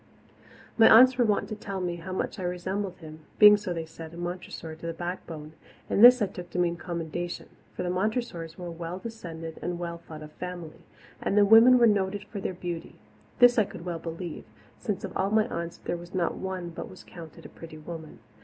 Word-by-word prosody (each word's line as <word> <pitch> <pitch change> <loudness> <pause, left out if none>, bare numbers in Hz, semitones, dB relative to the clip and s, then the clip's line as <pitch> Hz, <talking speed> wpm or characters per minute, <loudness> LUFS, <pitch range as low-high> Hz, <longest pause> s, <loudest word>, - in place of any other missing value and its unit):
My 225 - +9
aunts 255 +2 +8
were 240 - +5
wont 210 -2 +1
to 215 - -4
tell 200 -2 -5
me 175 -1 -2
how 175 +3 -8
much 185 +2 -3
I - - -4
resembled 185 +2 -3
him, 155 -2 -11 0.2
being, 210 -1 +9
so 205 -3 -4
they 165 -2 -3
said, 160 0 -10
a - - -10
Montressor 175 -2 -6
to 170 - -6
the 165 - -4
backbone; 165 -3 -6 0.4
and 205 - +4
this 245 -1 +9
I - - +4
took 180 -2 -9
to - - -6
mean 175 -1 +2
commendation, 170 0 -5 0.3
for - - -3
the 175 - -1
Montressors 185 -4 -2
were 180 - -7
a 175 - -5
well 170 +1 -6
descended 170 -7 -8
and 175 0 -3
well 170 -1 -5
thought 155 -2 -10
of 150 - -11
family, 175 -2 -8 0.4
and 200 - 0
the 205 - +7
women 225 +4 +8
were 240 - +6
noted 205 -2 +1
for 205 -1 -7
their 185 - -3
beauty. 175 -2 -6 0.4
This 245 -1 +6
I - - +5
could 185 -3 -9
well 170 -2 -3
believe, 165 0 -6 0.3
since 205 -3 -3
of - - -6
all 195 - +1
my 215 0 +3
aunts 170 -2 -4
there 175 - -4
was 175 +2 -11
not 175 -2 +1
one 185 -2 -5
but - - -7
was 185 - -13
counted 165 -3 -12
a - - -9
pretty 160 -1 -11
woman. 160 0 -9
175 Hz, 220 wpm, -27 LUFS, 165-200 Hz, 0.4 s, My